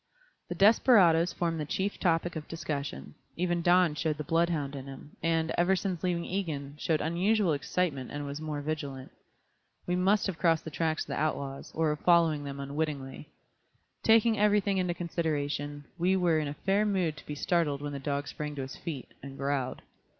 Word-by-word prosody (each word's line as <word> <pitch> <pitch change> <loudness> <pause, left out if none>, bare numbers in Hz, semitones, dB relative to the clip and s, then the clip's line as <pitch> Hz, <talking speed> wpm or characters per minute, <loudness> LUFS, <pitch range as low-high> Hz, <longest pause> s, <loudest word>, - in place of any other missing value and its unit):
The - - -3
desperadoes 195 -6 +5
formed 165 -2 -1
the 150 - -2
chief 190 +7 -2
topic 170 0 +1
of 155 -1 -6
discussion, 150 -3 -5 0.2
even 175 0 0
Don 175 -1 +4
showed 155 0 -1
the 150 - -4
bloodhound 165 -4 0
in 135 0 -7
him, 135 +2 -10
and, 165 -1 +1
ever 180 +2 +4
since 185 -3 -2
leaving 175 -2 -1
Egan, 155 -7 -3
showed 160 0 +1
unusual 180 +3 +2
excitement 140 -2 -1
and 145 0 -5
was 140 +2 -5
more 150 -2 -3
vigilant. 145 -3 -4 0.7
We 180 - 0
must 195 +3 +3
have 190 -5 -3
crossed 165 -2 +3
the 160 - -5
tracks 160 0 0
of - - -17
the - - -2
outlaws, 140 -3 -3
or 160 -1 +2
were 150 - +1
following 165 -3 +3
them 140 0 -6
unwittingly. 140 -1 -4 0.7
Taking 225 -1 +4
everything 205 -2 +3
into 180 -2 0
consideration, 145 -4 -2
we 185 +3 +3
were 175 -4 +3
in 150 - -2
a 145 - -5
fair 195 +6 +1
mood 185 -7 0
to - - -12
be 150 - -4
startled 145 -3 0
when 145 0 -4
the 140 - -4
dog 140 +1 -2
sprang 150 +2 -5
to 135 - -3
his 130 - -7
feet, 145 -7 -7
and 135 0 -9
growled. 135 -2 -2
160 Hz, 185 wpm, -29 LUFS, 145-180 Hz, 0.7 s, desperadoes